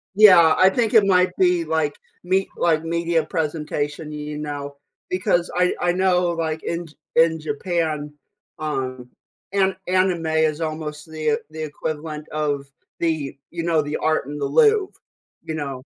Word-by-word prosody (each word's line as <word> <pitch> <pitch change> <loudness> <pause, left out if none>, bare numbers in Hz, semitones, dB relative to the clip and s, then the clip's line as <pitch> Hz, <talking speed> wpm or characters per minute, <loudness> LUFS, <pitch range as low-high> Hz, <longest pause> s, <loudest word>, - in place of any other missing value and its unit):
Yeah, 180 -6 +8
I 185 - +6
think 230 +2 0
it 220 -3 +6
might 180 -1 +3
be 180 -2 +3
like 155 -2 0 0.3
me 190 +2 +1
like 160 -2 +2
media 170 -1 0
presentation, 150 -2 -3
you 150 0 -5
know, 145 -1 -5 0.3
because 180 -1 +1
I 180 0 +3
I 175 - +2
know 180 -1 +2
like 160 -1 -3
in 170 0 -3 0.3
in 160 0 +4
Japan, 155 -1 -2 0.5
um, 130 -5 -3 0.4
an 190 -1 +2
anime 185 -2 +1
is 160 0 +1
almost 155 -1 -5
the 155 -1 0
the 155 0 -6
equivalent 155 0 -5
of 145 -2 -1 0.3
the, 155 -5 -1
you 170 -1 -4
know, 165 -2 +2
the 145 +1 -3
art 155 -3 0
in 145 +2 -6
the 140 - -1
Louvre, 410 - +3 0.5
you 160 - -5
know. 140 -4 -5
160 Hz, 150 wpm, -22 LUFS, 150-175 Hz, 0.5 s, Yeah